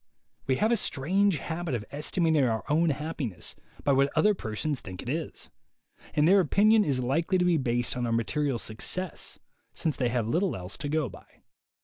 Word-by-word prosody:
We 130 - +3
have 215 - +2
a 235 - +4
strange 190 +3 +1
habit 165 -1 -3
of 105 -3 -4
estimating 155 +1 +1
our 115 -3 0
own 160 +3 +3
happiness 145 - -3 0.3
by 140 - +3
what 135 +1 +3
other 210 0 +4
persons 130 - -3
think 95 -1 -8
it - - -6
is; 160 +4 -4 0.6
and 150 +1 +4
their 195 +3 +6
opinion 210 +6 +4
is 140 -6 0
likely 165 +9 +1
to 180 - +2
be 175 -2 +3
based 120 -3 0
on 125 -1 -1
our - - -1
material 135 +4 0
success, 145 +12 -3 0.4
since 160 -4 -1
they 125 -3 0
have 120 -2 -1
little 175 - +1
else 95 +1 -6
to 145 0 -3
go 155 -2 +1
by. 100 - -13
145 Hz, 190 wpm, -28 LUFS, 120-170 Hz, 0.6 s, their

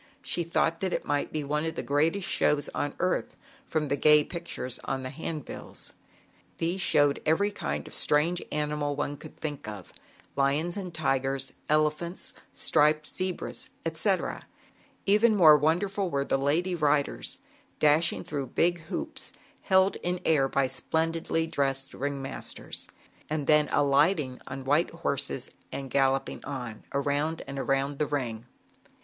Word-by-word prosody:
She 175 - 0
thought 165 0 +1
that 190 -1 -1
it - - -2
must 145 -1 0
be 155 -1 -2
one 150 +2 -1
of 160 0 -2
the - - -3
greatest 165 +7 +1
shows 150 -5 +1
on 145 - -3
earth, 185 +1 0 0.3
from 155 -2 0
the 140 - +1
gay 150 +1 +6
pictures 170 -8 -4
on 135 -1 -2
the 130 - -5
hand 155 0 -5
bills. - - -9 0.6
These 175 +3 -1
showed 145 -4 +3
every 200 +7 +2
kind 75 - -3
of - - -10
strange 160 +4 +2
animal 150 -1 -1
one 145 0 -2
could 145 - -12
think 145 -7 -5
of, 105 -4 -8 0.4
lions 145 +5 +1
and 190 -3 -5
tigers, 135 -3 -1 0.2
elephants, 155 +3 0 0.2
striped 155 +1 +3
zebras, 185 +2 -4 0.2
etc. - - 0 0.6
Even 215 +3 +5
more 160 -6 +8
wonderful 180 +6 +1
were 140 -3 0
the - - +1
lady 155 +7 +1
riders, 150 -3 +1 0.4
dashing 155 +2 +3
through 140 -3 -3
big 175 +7 +2
hoops - - -5 0.3
held 190 0 +3
air 160 -6 +2
by 140 0 +2
splendidly 160 +4 0
dressed 135 -4 -1
ring 140 +1 -3
masters 135 - -4 0.4
d 155 - 0
then 150 +1 +4
alighting 145 -1 +2
on 130 0 -6
white 145 +5 +3
horses 140 -5 -2 0.2
and 135 -2 -5
galloping 135 0 +1
on, 125 -6 -6
around 145 +3 0
and 140 0 -5
around 135 +1 0
the 150 - +1
ring. 120 -5 -3
150 Hz, 145 wpm, -28 LUFS, 140-165 Hz, 0.6 s, more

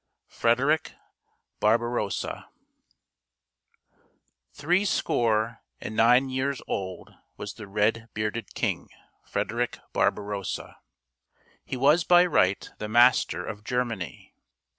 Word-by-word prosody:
FREDERICK 135 +7 +1 0.7
BARBAROSSA 115 -1 0 2.0
Three 175 +7 +1
score 115 - 0 0.2
and 110 - -6
nine 125 +4 +4
years 130 +1 -1
old 95 -2 -5 0.2
was 105 - -6
the 105 - -10
red 110 +3 0
bearded 110 +2 -3
king, - - -2 0.4
Frederick 120 +2 -2 0.2
Barbarossa. 100 -2 -2 0.9
He 130 - -5
was 150 +6 +4
by 175 0 +6
right 95 - +2
the 105 - -4
master 120 +3 +4
of 105 -1 -7
Germany. 115 - -3
115 Hz, 95 wpm, -26 LUFS, 105-130 Hz, 2.0 s, by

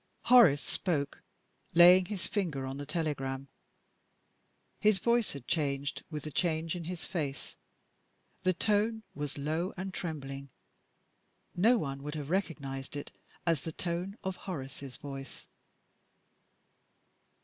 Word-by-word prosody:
Horace 210 - +7
spoke, 145 -7 -1 0.5
laying 180 +2 +9
his 195 -2 -4
finger 165 -10 -1
on 135 +1 -4
the 145 0 -6
telegram. 140 -4 -2 1.3
His 210 -2 +5
voice 235 +3 +2
had 140 -3 -9
changed 140 -3 0
with 150 -3 -5
the 155 - -5
change 160 0 0
in 170 -2 -5
his 175 -1 -4
face. 145 -6 -4 0.9
The 185 - +3
tone 215 +3 +1
was 145 0 -4
low 160 +6 -1
and 190 +1 -4
trembling: 140 -6 -5 1.1
no 225 +8 +5
one 135 -7 -3
would 150 +2 -5
have 150 0 -4
recognized 140 -8 -2
it 145 - -5 0.3
as 165 -5 +2
the 165 - -4
tone 180 +5 -2
of 190 -1 -2
Horace's 140 -6 -6
voice. 135 -2 -8
160 Hz, 125 wpm, -32 LUFS, 140-185 Hz, 1.3 s, laying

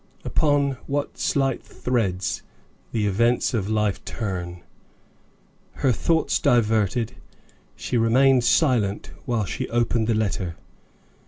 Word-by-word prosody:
Upon 145 -3 +1
what 145 +1 -3
slight 135 -2 0
threads 100 -7 -2 0.5
the 110 -2 0
events 115 +6 +2
of 105 -4 -1
life 105 -2 0
turn! 90 -5 -5 1.1
Her 130 - +1
thoughts 160 +7 +1
diverted, 110 0 +2 0.6
she 120 - -2
remained 125 +3 +4
silent 120 -7 +2
while 120 -5 0
she - - -4
opened 120 -1 +1
the 115 - +2
letter. 95 -5 -1
115 Hz, 105 wpm, -24 LUFS, 105-125 Hz, 1.1 s, remained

